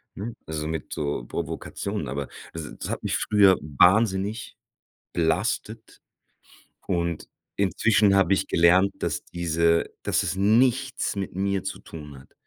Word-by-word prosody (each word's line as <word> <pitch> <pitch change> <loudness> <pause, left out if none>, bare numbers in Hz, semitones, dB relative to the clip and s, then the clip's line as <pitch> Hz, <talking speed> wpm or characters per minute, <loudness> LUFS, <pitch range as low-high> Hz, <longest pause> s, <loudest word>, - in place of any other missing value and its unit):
ne, 110 +4 -5
also 75 -1 -4
mit 80 -2 -4
so 70 -5 -3
Provokationen. 80 0 -4
Aber 70 +2 -4 0.3
das 80 -2 -7
das - - -5
hat - - -4
mich - - -1
früher 100 -3 +4
wahnsinnig 95 - +2 0.6
belastet 100 +6 -2 0.9
und 85 -3 -1 0.3
inzwischen 100 +1 +3
hab 95 0 +3
ich 95 0 +2
gelernt, 90 +3 +4
dass - - -2
diese 85 -1 +1 0.2
dass - - +1
es - - -2
nichts 125 +6 +2
mit 95 -2 -4
mir 100 0 -1
zu 95 - -5
tun 75 -4 -10
hat. - - -20
95 Hz, 135 wpm, -25 LUFS, 80-100 Hz, 0.9 s, früher